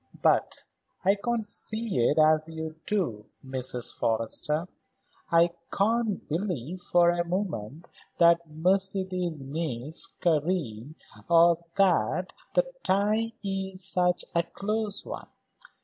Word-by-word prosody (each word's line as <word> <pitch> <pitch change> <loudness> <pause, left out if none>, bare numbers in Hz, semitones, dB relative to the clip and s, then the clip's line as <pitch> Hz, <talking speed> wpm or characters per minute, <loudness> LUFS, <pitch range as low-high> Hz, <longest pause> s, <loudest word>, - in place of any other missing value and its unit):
But - - +2 0.4
I 195 - +6
can't 225 +2 -2
see 215 - -3
it 120 +6 +2
as 155 0 +4
you 160 -1 -5
do, 140 - -1 0.2
Mrs. 130 -2 -4
Forrester. 115 +9 -1 0.6
I 170 +1 +5 0.2
can't 220 0 0
believe 175 - -3
for 175 -1 +4
a 175 0 0
moment 170 - -4 0.3
that 170 -1 +4
Mercedes 185 -2 0
needs 150 +2 -3
Karen 155 - -1 0.3
or 170 0 +5
that 185 - +2 0.2
the - - +5 0.2
tie 210 +4 +1 0.2
is 190 -1 +3
such 180 -2 +2
a 170 - +3
close 210 +3 -2
one. - - -7
175 Hz, 110 wpm, -27 LUFS, 155-195 Hz, 0.6 s, I